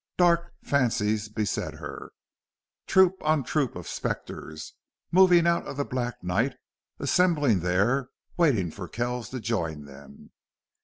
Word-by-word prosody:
Dark 170 -1 +3
fancies 110 -6 +1
beset 105 -1 -2
her. - - -8 0.8
Troop 190 0 +4
on 155 -2 +2
troop 140 0 -1
of 90 -1 -7
specters 80 0 -5 0.4
moved 185 +1 +6
out 170 0 +1
of 140 - -6
the 140 - -1
black 120 -4 -4
night, 105 +10 0 0.4
assembling 150 - +2
there, 100 +10 +1 0.3
waiting 120 - +2
for 90 +1 -7
Kells 120 +3 -3
to 130 - -5
join 85 -10 -2
them. 70 0 -14
120 Hz, 125 wpm, -27 LUFS, 95-150 Hz, 0.8 s, moved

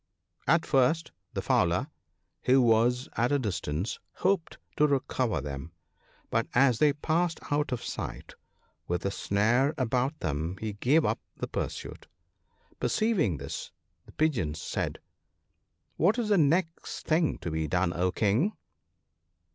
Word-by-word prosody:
At 165 +3 +4
first 145 +5 +2 0.2
the - - -2
fowler, - - +2 0.6
who 130 +1 +5
was 120 +1 +3
at 120 +3 +2
a 145 - +4
distance, 95 - -2
hoped 185 -3 0 0.2
to 150 - +5
recover 130 - 0
them; 70 +3 -6 0.6
but 115 0 +1
as 125 -2 +4
they 150 -2 +5
passed 165 +3 0
out 145 -1 +1
of 125 -2 -2
sight - - -5 0.5
with 90 0 -1
the 100 - 0
snare 120 +10 +2
about 130 +4 0
them 80 +3 -2
he 110 -1 -3
gave 135 +10 +3
up - - 0 0.2
the - - -3
pursuit. - - -5 0.7
Perceiving 195 - +1
this, 70 +1 -6 0.4
the - - -13
Pigeons 100 - 0
said, - - -3 0.5
' - - -48
What 195 - +3
is 230 -3 -1
the 205 - +4
next 165 +3 0
thing 160 0 +2
to 85 - -5
be 80 0 -1
done, 90 0 +1
O 90 +2 +1
King 115 - +2
125 Hz, 140 wpm, -29 LUFS, 95-155 Hz, 0.7 s, who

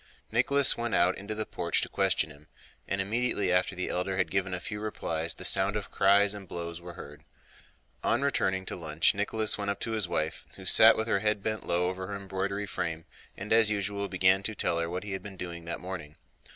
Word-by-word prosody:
Nicholas 135 +4 +4
went 120 -1 -2
out 90 +2 +3
into 105 +2 -6
the 110 0 -3
porch - - -1
to - - -1
question 75 - +1
him, 75 +1 -16 0.4
and 100 - -1
immediately 105 -1 0
after 90 +1 +2
the 90 - -2
elder 95 +1 -1
had 95 - 0
given 95 -1 0
a 90 - -2
few 105 +3 -5
replies 85 -6 -2
the 95 - -5
sound 95 +3 +3
of 105 -2 -4
cries 100 +1 +4
and 100 -2 -9
blows 85 0 -6
were 85 0 -9
heard. 75 -4 -11 0.8
On 120 +4 +2
returning 95 -9 0
to - - -3
lunch 80 -2 +1
Nicholas 105 +2 +1
went 100 0 -2
up 100 0 -2
to 115 - -3
his 110 -4 0
wife, 80 -2 -2
who - - -11
sat - - +7
with 110 +1 -1
her 100 - +2
head 105 -1 0
bent 110 -1 -3
low 90 +1 +1
over 95 0 -4
her 100 - -4
embroidery 100 +1 -3
frame, 80 -4 -4 0.3
and 100 +3 -2
as 110 -1 +5
usual 100 -1 -2
began 95 0 +3
to 105 +2 -3
tell 85 - 0
her 85 0 -1
what 90 +2 -4
he 105 - -6
had 95 - -3
been 100 -2 -10
doing 85 -2 -7
that 85 - -4
morning. 90 -5 -7
95 Hz, 225 wpm, -29 LUFS, 90-105 Hz, 0.8 s, sat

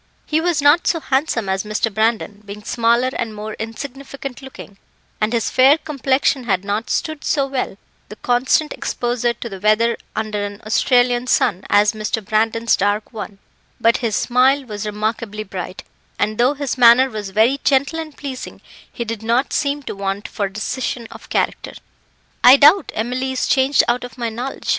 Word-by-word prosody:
He 310 +1 0
was 330 -4 0
not 295 +4 +5
so 330 - +2
handsome 265 -6 -1
as 190 0 -1
Mr. 215 +1 -2
Brandon, 215 -1 0
being 205 +1 -9
smaller 235 +3 +1
and 225 -2 -3
more 215 +1 -6
insignificant 270 +3 -7
looking, 260 -7 -12 0.4
and 215 +1 +1
his 235 -2 0
fair 270 +4 +5
complexion 275 -3 0
had 190 -3 0
not 210 +2 -2
stood 310 +4 -2
so 280 -3 +1
well 265 -7 -3 0.3
the 210 - -9
constant 250 +7 +1
exposure 240 0 -1
to 235 - -7
the 195 -4 -8
weather 215 +3 +2 0.2
under 215 -2 -2
an 205 0 -6
Australian 245 +2 +2
sun 190 -6 +1
as 205 +1 +4
Mr. 215 0 -3
Brandon's 225 +2 +1
dark 205 +4 -1
one, 210 -2 -7 0.4
but 230 0 +3
his 230 -4 -1
smile 260 +3 +2
was 210 -2 -5
remarkably 215 0 -3
bright, 185 -2 -7 0.3
and 215 +1 -1
though 255 +4 +3
his 275 -2 -3
manner 245 +2 +7
was 215 -5 -6
very 225 +8 +2
gentle 280 +4 +2
and 310 -3 -7
pleasing, 270 -3 -7 0.3
he 235 - -5
did 225 -1 -5
not 235 +4 0
seem 285 0 -1
to - - -5
want 195 +1 -3
for 200 -3 -3
decision 235 +3 -4
of - - -13
character. - - -1 0.7
"I 255 +3 +9
doubt 305 +8 +5
Emily 255 +4 -2
is 260 - -1
changed 270 +1 +3
out 240 +1 0
of 245 -1 -9
my 235 -2 -2
knowledge. 245 +4 -6
235 Hz, 175 wpm, -19 LUFS, 215-265 Hz, 0.7 s, I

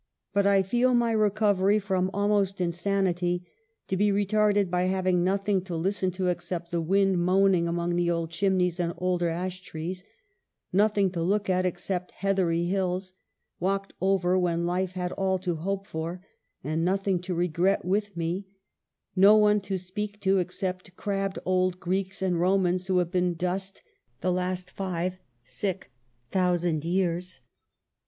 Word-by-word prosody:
But 200 0 +3
I 195 -1 +4
feel 245 +6 +2
my 235 -1 +2
recovery 205 -2 +3
from 190 -2 0
almost 200 -1 +1
insanity 175 0 0 0.4
to 190 - -1
be 205 +2 +3
retarded 205 -1 +2
by 180 0 +1
having 185 -1 +1
nothing 195 +1 +1
to 180 -3 -4
listen 185 +3 0
to 185 0 0
except 175 0 -3
the 170 -1 0
wind 195 +2 +2
moaning 185 -1 +3
among 175 0 0
old 170 -1 -1
chimneys 180 0 +1
and 170 -1 -1
older 180 -1 0
ash 180 +2 -4
trees 180 +1 -6 0.4
— - - -53 0.3
nothing 205 -1 +3
to 175 -2 -3
look 200 +3 +1
at 185 0 +2
except 180 +1 -3
heathery 180 -4 +1
hills, 185 0 -1 0.5
walked 195 +2 -1
over 185 -1 +2
when 170 -1 0
life 180 +1 -1
had 180 -1 -3
all 190 -1 0
to 180 -2 -2
hope 195 +4 -3
for 170 +3 -5 0.4
and 155 +4 -1
nothing 190 +1 +1
to 180 0 -3
regret 175 +3 +1
with 200 0 -1
me 175 +4 -2 0.3
— - - -60 0.3
no 200 +3 +7
one 210 -1 +4
to 195 0 -3
speak 205 +3 -5
to 195 0 +3
except 180 0 -4
crabbed 195 -1 -2
old 185 -1 +1
Greeks 190 +2 -2
and 180 -3 +1
Romans 185 0 +2
who 185 -1 +2
have 175 -1 +1
been 180 -2 +1
dust 190 +3 -3 0.4
the 185 - +1
last 180 0 -2
five 185 -1 -3 1.1
thousand 175 -4 +1
years. 175 -2 -1
185 Hz, 155 wpm, -27 LUFS, 175-195 Hz, 1.1 s, no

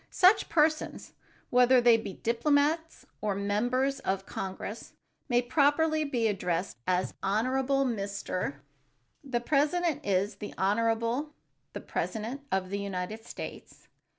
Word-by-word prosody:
Such 375 +3 +4
persons, 310 -1 +1 0.4
whether 250 +1 +6
they 240 -1 +6
be 220 -4 -3
diplomats 285 - +1 0.2
or 210 -2 0
members 245 +7 0
of 195 -6 -2
Congress, 195 +3 -6 0.4
may 245 0 +3
properly 310 +4 +2
be 240 -5 0
addressed 180 - -2
as 180 0 +1
"Honorable 260 +7 +1
Mr. 200 - -3 0.3
——." 120 - -44
The 240 - +2
president 300 +4 +1
is 200 +1 0
"The 205 - -7
Honorable, 230 +8 0 0.4
the - - -5
President 230 +5 -3
of 190 -1 -1
the 200 - -1
United 200 +3 -4
States." - - -9
235 Hz, 125 wpm, -29 LUFS, 200-275 Hz, 0.4 s, whether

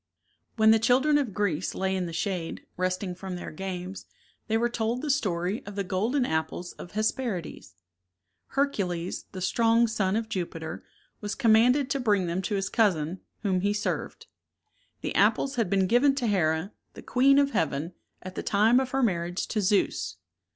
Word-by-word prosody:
When 220 -1 +5
the 225 - +5
children 265 +6 +4
of 265 -7 -2
Greece 185 -4 -1
lay 190 0 0
in 185 -2 -1
the - - -6
shade, 170 0 -3
resting 185 +1 -1
from 185 0 -6
their 175 - -6
games, 185 +2 -6 0.4
they 225 0 +2
were 235 +1 +2
told 235 +2 -2
the 300 - +1
story 190 -6 -1
of 200 - -7
the 200 - -1
golden 220 +9 0
apples 160 +1 -2
of 175 - -11
Hesperides. 215 - -2 0.7
Hercules, 190 -11 -1
the 185 - -7
strong 230 +5 +3
son 205 -4 0
of 225 0 -1
Jupiter, 170 -6 -5 0.4
was 205 0 -3
com 230 -5 +4
manded 250 +5 +4
to 275 - 0
bring 205 -6 +2
them 175 +2 -1
to 205 +2 -2
his 195 -1 -1
cousin, 180 -5 +1 0.2
whom 185 -3 +1
he 200 +2 +1
served. 210 - -3 0.8
The - - -3
apples 275 - +3
had 225 -6 +1
been 195 -1 +2
given 245 +7 +4
to 265 -3 -1
Here, 175 -3 +1 0.2
the - - -10
queen 275 +2 +4
of 280 0 +3
heaven, 160 - -1 0.3
at 185 0 -7
the - - -4
time 220 +5 +4
of 265 -1 -1
her 265 +1 0
marriage 175 -4 -1
to 215 - 0
Zeus. 200 +1 +1
200 Hz, 180 wpm, -27 LUFS, 180-235 Hz, 0.8 s, When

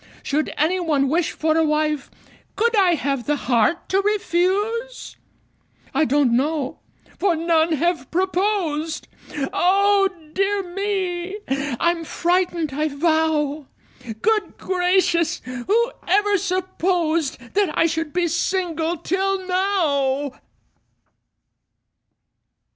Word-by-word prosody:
Should 300 +2 -1
any 340 +5 +2
one 295 -6 +1
wish 330 +3 +1
for 315 0 0
a 325 - +3
wife, 305 -2 0 0.5
Could 465 +1 +2
I 375 -4 +4
have 275 -5 -2
the 295 - +2
heart 260 +5 +1
to 385 +1 +2
refuse? 415 +4 -1 0.8
I 315 - +3
don't 275 -3 +2
know 280 +1 -1 0.4
for 385 -4 +2
none 325 0 +2
have 340 +3 0
proposed 360 -4 -1 0.5
Oh, 395 +2 +3 0.2
dear 395 +1 +1
me! 380 -1 -2 0.4
I'm 340 -1 +1
frightened, 345 -2 0
I 305 +3 0
vow! 305 -1 0 0.6
Good 435 -1 +1
gracious! 355 -2 +1
who 380 - 0 0.2
ever 410 +3 +3
supposed 355 -4 0 0.2
That 405 -3 +2
I - - +4
should 325 -1 -1
be 355 +1 +1
single 340 -1 -1
till 385 +3 -1
now? 290 -8 +1
345 Hz, 105 wpm, -22 LUFS, 310-385 Hz, 0.8 s, I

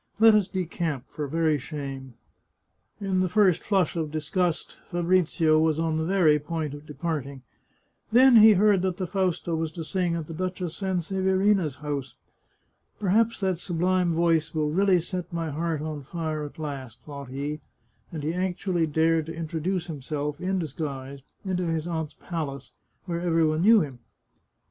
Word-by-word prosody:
Let 225 0 +8
us 210 -3 +3
decamp, 165 -6 -3
for 150 -2 -4
very 160 0 +1
shame." 135 -3 -7 0.8
In 195 -2 0
the 185 -1 +1
first 195 -3 +4
flush 190 -6 +1
of 160 -2 -2
disgust, 160 +3 -1
Fabrizio 170 -2 +2
was 160 -1 +2
on 160 -1 0
the 160 - 0
very 165 -5 +4
point 155 -1 -3
of 145 +1 -10
departing. 140 -3 -4 0.7
Then 250 +2 +7
he 220 0 +9
heard 200 -1 +4
that 185 -1 -1
the 185 - -2
Fausta 180 -2 -1
was 160 -1 -2
to 165 - -5
sing 175 +2 -1
at 165 -2 -3
the 165 - -8
Duchess 180 0 -3
Sanseverina's 190 -2 +1
house. 140 -4 -3 0.4
" - - -44
Perhaps 215 +3 +2
that 190 -3 0
sublime 180 0 +1
voice 165 -2 +2
will 150 -1 +1
really 190 +1 +4
set 180 +1 -5
my 165 -2 -3
heart 160 0 -2
on 155 -2 -4
fire 155 +1 -4
at 145 - -10
last," 135 -7 -6
thought 140 -3 -8
he, 145 +3 -4 0.5
and 155 -3 -5
he 155 +3 -1
actually 180 -2 0
dared 160 +1 +2
to 165 - -6
introduce 165 +2 -2
himself, 150 -2 -4
in 190 +1 0
disguise, 140 -4 -5 0.3
into 180 -2 -1
his 165 -1 -1
aunt's 160 -3 -3
palace, 140 -7 -5 0.3
where 170 -2 -3
every 165 -2 +2
one 155 +1 +1
knew 220 +2 +7
him. 135 -6 -5
165 Hz, 165 wpm, -26 LUFS, 150-185 Hz, 0.8 s, he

